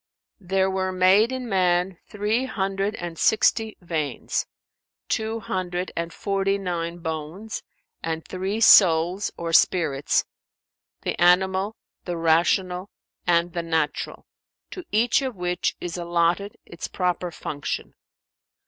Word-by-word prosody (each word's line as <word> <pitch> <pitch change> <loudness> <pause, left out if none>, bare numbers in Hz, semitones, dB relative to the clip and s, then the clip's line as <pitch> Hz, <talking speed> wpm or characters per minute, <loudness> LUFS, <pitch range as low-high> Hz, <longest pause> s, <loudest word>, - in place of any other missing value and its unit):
[FN#394] 180 - -18
There 190 0 +2
were 190 0 -1
made 190 +5 +4
in 260 -1 -4
man 180 -2 +1
three 210 +5 0
hundred 195 -2 -2
and 175 -4 -6
sixty 220 0 +2
veins, 155 -6 -2 0.6
two 220 +1 -1
hundred 180 -1 -3
and 170 0 -3
forty 195 +2 0
nine 175 -3 -3
bones, 165 +6 -5 0.4
and 160 0 -4
three 190 +3 -3
souls[FN#395] 180 -3 +6
or 165 -1 -4
spirits, 155 -5 +3 0.8
the - - -3
animal, 190 +4 +3 0.3
the 175 -2 -3
rational 180 +3 +2 0.4
and 170 0 +2
the 170 - -1
natural, 160 -3 -2 0.5
to 370 - -7
each 230 +5 +3
of 260 -4 -3
which 180 -1 -1
is 175 0 -5
allotted 175 +3 0
its 170 - -7
proper 180 -1 -1
function. 145 -3 -5
180 Hz, 120 wpm, -24 LUFS, 170-200 Hz, 0.8 s, souls[FN#395